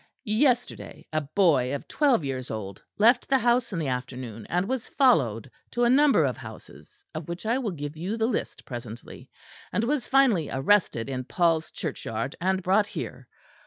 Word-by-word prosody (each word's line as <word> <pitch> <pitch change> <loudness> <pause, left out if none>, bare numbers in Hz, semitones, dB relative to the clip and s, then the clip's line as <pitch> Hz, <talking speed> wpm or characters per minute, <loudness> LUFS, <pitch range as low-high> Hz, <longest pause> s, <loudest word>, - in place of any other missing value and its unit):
Yesterday, 245 +3 0
a 155 - +1
boy 145 -5 +2
of 140 - -7
twelve 270 - +2
years 130 -2 -4
old, 100 -3 -6 0.2
left 235 +4 +4
the 270 - +5
house 240 -1 +2
in 185 - -3
the 160 -3 -2
afternoon, 125 -4 -5
and 180 +2 0
was 260 -2 -3
followed 135 - +2 0.2
to 240 - -1
a 240 - +4
number 285 +1 +5
of - - -2
houses, 415 -1 -13
of 170 - -6
which 170 +4 -6
I 235 +4 +1
will 240 -5 -2
give 145 -4 -6
you 185 +8 -3
the 220 - +1
list 245 - -3
presently; 120 -2 -9 0.4
and 220 - 0
was 270 +2 -1
finally 245 - +3
arrested 135 - +2
in 130 -2 -4
Paul's 165 +1 +1
Churchyard 130 -5 -4
and 190 +1 0
brought 200 +3 +3
here. - - -7
180 Hz, 175 wpm, -26 LUFS, -, 0.4 s, the